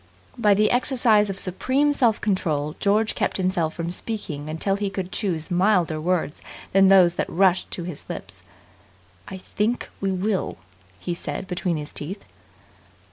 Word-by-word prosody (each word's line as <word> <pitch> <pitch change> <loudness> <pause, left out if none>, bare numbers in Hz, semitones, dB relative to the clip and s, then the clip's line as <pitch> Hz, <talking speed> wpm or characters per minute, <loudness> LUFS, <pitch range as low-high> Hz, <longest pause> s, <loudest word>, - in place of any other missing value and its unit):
By 210 -5 +4
the 210 +1 +3
exercise 235 -5 +3
of 195 - -4
supreme 260 +11 +1
self 235 -6 +2
control 155 -7 -1
George 210 +2 +2
kept - - -1
himself 180 -4 0
from 170 0 -3
speaking 170 -7 -5
until 165 +5 -1
he 200 0 -2
could 190 -2 -5
choose 180 -5 -2
milder 175 -4 +2
words 170 -3 -1 0.3
than 195 0 +5
those 185 -3 +6
that - - -2
rushed 185 +1 +2
to 175 - -5
his 170 -4 -7
lips. 95 0 -7 0.9
"I 190 - -7
think 210 +5 -2
we 195 -1 -1
will!" 190 +1 -1 0.4
he 175 - -3
said 170 - -5
between 180 -2 -2
his 150 0 -7
teeth. 190 +7 -6
190 Hz, 155 wpm, -24 LUFS, 170-210 Hz, 0.9 s, those